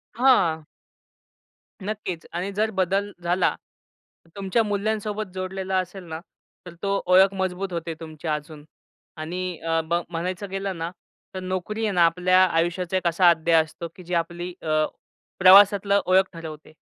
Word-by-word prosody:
हां. 190 -11 +3 1.2
नक्कीच 190 -5 -5
आणि 185 +3 -3
जर 215 +2 +1
बदल 195 +2 0
झाला. 175 +1 +1 0.8
तुमच्या 200 +3 +1
मूल्यांसोबत 210 +1 -2
जोडलेला 190 0 -3
असेल 185 +1 -4
ना, 160 0 -5 0.5
तर 180 - -9
तो 200 0 0
ओळख 190 +2 +5
मजबूत 190 0 -2
होते 165 -1 -3
तुमची 155 0 -9
अजून 150 0 -4 0.6
आणि 180 +2 -4
अ, 165 0 0
ब 170 +1 +1
म्हणायचं 180 +3 -4
गेलं 195 -1 -3
ना, 165 +1 -4 0.4
तर - - -3
नोकरी 185 +4 -3
आहे 210 - 0
ना 175 -1 +6
आपल्या 180 +2 +4
आयुष्याचा 175 +1 0
एक 180 - -1
असा 175 +1 +5
अध्याय 165 0 +4
असतो, 165 +2 -8
की 185 - -12
जी 180 +1 -6
आपली 175 +1 -2
अ, 155 -1 +1 0.5
प्रवासातलं 200 +1 +7
ओळख 190 +1 +4
ठरवते. 155 -2 -9
185 Hz, 145 wpm, -24 LUFS, 165-195 Hz, 1.2 s, प्रवासातलं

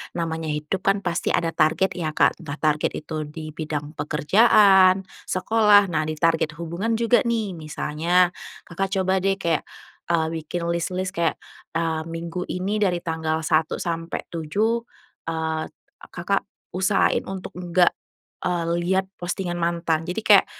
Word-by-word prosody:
namanya 165 -1 -2
hidupkan 185 +7 -1
pasti 170 - -2
ada 165 -1 0
target 160 +4 +2
ya 155 -4 -4
Kak, - - +3
entah 160 -4 -6
target 150 0 0
itu 155 0 -5
di 155 +1 -8
bidang 150 -2 -4
pekerjaan, 190 +4 +5 0.2
sekolah, 205 0 +4
nah 155 -1 0
di 155 - -2
target 160 -1 +1
hubungan 170 +8 -2
juga 235 +2 +3
nih, 225 -4 0
misalnya 165 +2 +1 0.3
Kakak 195 +4 -3
coba 190 0 +2
deh 195 +1 +1
kayak, 170 -5 -1 0.4
eee, 165 -2 +1
bikin 170 +2 -3
lis-lis 185 +2 -2
kayak, 170 -3 0 0.4
eee, 165 -1 0
minggu 165 +2 -5
ini 195 +4 -2
dari 180 -4 +1
tanggal 160 -1 -2
1 155 -1 +1
sampai 165 -1 -3
7, 200 +9 0 0.5
eee, 160 -1 -2 0.4
Kakak - - -2 0.2
usahain 190 +2 +1
untuk 190 -1 -6
enggak, 175 0 +3 0.5
eee, 175 -2 -1 0.2
lihat 190 +2 +1 0.2
postingan 175 0 -3
mantan 170 -1 0
jadi 180 +5 -2
kayak 205 -2 +7
170 Hz, 140 wpm, -23 LUFS, 160-190 Hz, 0.5 s, kayak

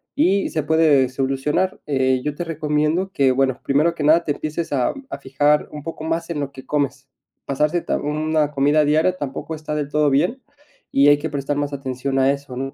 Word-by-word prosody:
y 200 -9 +2
se 155 - -2
puede 150 -4 +3
solucionar. 135 +7 -1
Eh, 130 -2 +1
yo 150 -1 -3
te 175 - -4
recomiendo 155 +2 0
que, 135 -7 +3
bueno, 130 -1 +1
primero 155 +5 +2
que 155 - -4
nada, 160 +3 +5
te 150 - -2
empieces 155 +2 -4
a 130 -3 +1 0.2
a - - -5
fijar 145 +3 +1
un 150 -1 -8
poco 165 0 -7
más 165 +1 -2
en 155 - -3
lo 140 -1 -3
que 130 -1 -12
comes. 140 -2 -2 0.4
Pasarte 150 +5 0
ta - - -1
1 155 0 0
comida 145 +2 +3
diaria 155 +5 +2
tampoco 145 +1 -5
está 155 0 -5
del 145 -2 -2
todo 150 0 +2
bien, 175 - +1 0.5
y 140 +1 +5
hay 145 0 +6
que 155 +2 -4
prestar 145 0 -2
más 145 0 -2
atención 135 0 -2
a 135 +1 +4
eso, 140 -2 -6
¿no? 135 +2 -4
150 Hz, 205 wpm, -21 LUFS, 135-155 Hz, 0.5 s, hay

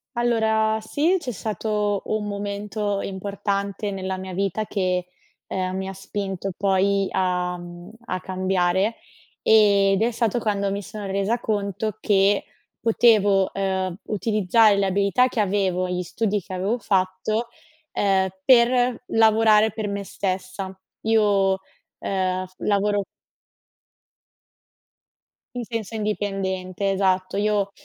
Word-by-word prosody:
Allora 220 -2 +2
sì, 295 +11 +1
c'è 280 -7 -4
stato 210 -1 -1
un 215 -1 -1
momento 205 0 -3
importante 200 +1 -3
nella 190 -1 -3
mia 185 0 -7
vita 195 +3 -1
che, 185 -3 -1 0.4
ehm, 185 0 -2
mi 190 0 -3
ha 195 - -5
spinto 195 0 -4
poi 195 0 +2
a 180 -1 0
mhmm, 175 +2 -10 0.2
a 185 - -2
cambiare, 185 +2 0 0.5
ed 200 -2 +4
è 235 +2 +2
stato 230 0 0
quando 200 -3 0
mi 200 +1 -2
sono 205 +1 -8
resa 200 +4 0
conto 205 -1 -2
che 200 0 +3 0.4
potevo, 210 -4 +4
ehm, 190 -1 -2
utilizzare 215 0 +3
le 200 -1 +1
abilità 200 +6 +2
che 240 - -3
avevo, 190 -3 +1
gli 180 0 -2
studi 210 +3 -1
che 185 +2 -10
avevo 195 +6 0
fatto, 200 +2 0 0.5
ehm, 190 -1 +2 0.2
per 245 0 +4
lavorare 220 -1 +5
per 215 +1 -4
me 200 0 -3
stessa. 190 0 -4 0.3
Io, 205 -3 +3 0.4
ehm, 185 -1 -1
lavoro 205 0 +1 2.5
In 245 - -3
senso 225 -1 -5
indipendente, 195 -2 -2
esatto. 190 -1 +1
Io 205 -1 +1
200 Hz, 120 wpm, -23 LUFS, 190-215 Hz, 2.5 s, lavorare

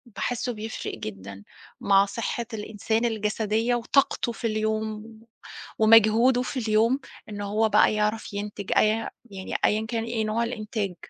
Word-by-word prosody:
باحِسه 245 +4 -2
بيفرِّق 220 0 -5
جدًا 100 -2 -8 0.4
مع 195 0 +4
صحة 230 +3 -3
الإنسان 220 +2 -2
الجسدية 220 +1 0
وطاقته 240 0 +1
في 230 - -3
اليوم، 215 0 -2
و 225 0 -15 0.5
ومجهوده 225 +3 +5
في 255 +1 -4
اليوم، 225 +4 +2 0.3
إن 205 -1 -6
هو 215 +2 +1
بقى - - +4
يعرف 215 0 -1
ينتج، 205 -1 -5
أي - - +5 0.4
يعني، 190 -1 -6
أيًا 215 +1 +1
كان 230 -1 -2
إيه 230 -1 -2
نوع 220 +2 0
الإنتاج، 215 -5 -3
220 Hz, 140 wpm, -25 LUFS, 210-230 Hz, 0.5 s, ومجهوده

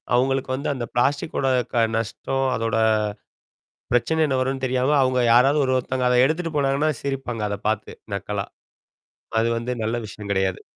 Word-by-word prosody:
அவங்களுக்கு 135 +1 +1
வந்து 140 +3 -3
அந்த 120 -3 -4
பிளாஸ்டிக்கோட 140 +2 0 0.3
க 115 -1 +4
நஷ்டம், 135 +4 -2
அதோட 115 -1 -1 1.2
பிரச்சனை 160 +6 +2
என்ன 135 -3 0
வரும்ன்னு 130 0 -1
தெரியாம. 130 +3 +1
அவவுங்க 130 -1 +2
யாராவது 135 +5 +5
ஒரு 130 - +1
ஒருத்தவங்க 125 0 -1
அத 125 - +4
எடுத்துட்டு 165 +2 -2
போனாங்கன்னா 140 +2 +2
சிரிப்பாங்க 130 -5 -3
அத 100 - -3
பார்த்து 110 -1 -2 0.2
நக்கலா. 100 0 -3 0.9
அது 115 +1 +2
வந்து 120 +2 -3
நல்ல 110 +2 -1
விஷயம் 105 0 -9
கிடையாது. 95 -1 0
130 Hz, 150 wpm, -23 LUFS, 115-135 Hz, 1.2 s, யாராவது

